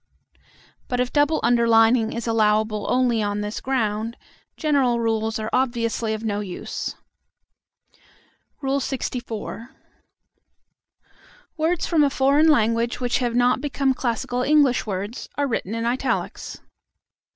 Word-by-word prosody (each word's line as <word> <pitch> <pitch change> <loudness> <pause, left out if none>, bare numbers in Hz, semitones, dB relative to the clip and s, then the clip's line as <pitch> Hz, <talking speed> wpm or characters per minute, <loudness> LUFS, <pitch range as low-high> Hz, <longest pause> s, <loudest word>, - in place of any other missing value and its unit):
But 245 - -2
if 250 0 -1
double 295 +2 +3
underlining 230 -1 +4
is 235 -1 -4
allowable 215 -2 +1
only 250 -3 +2
on 205 0 -1
this 210 +1 -4
ground, 225 -3 -1 0.4
general 275 -6 +2
rules 225 -1 0
are 220 0 -4
obviously 230 -3 0
of 215 - -8
no 205 -2 -1
use. 190 -4 -5 1.7
LXIV. 250 -4 -3 1.9
Words 330 +2 0
from 320 -3 +3
a 285 - +3
foreign 280 +3 +3
language 230 -4 +2
which 245 -1 0
have 240 -2 -1
not 245 +1 +3
become 275 -2 0
classical 245 0 -2
English 275 -4 +3
words, 200 +4 -5
are 290 - +1
written 225 -3 -2
in 230 0 -2
italics. 255 +2 -2
235 Hz, 120 wpm, -23 LUFS, 220-265 Hz, 1.9 s, underlining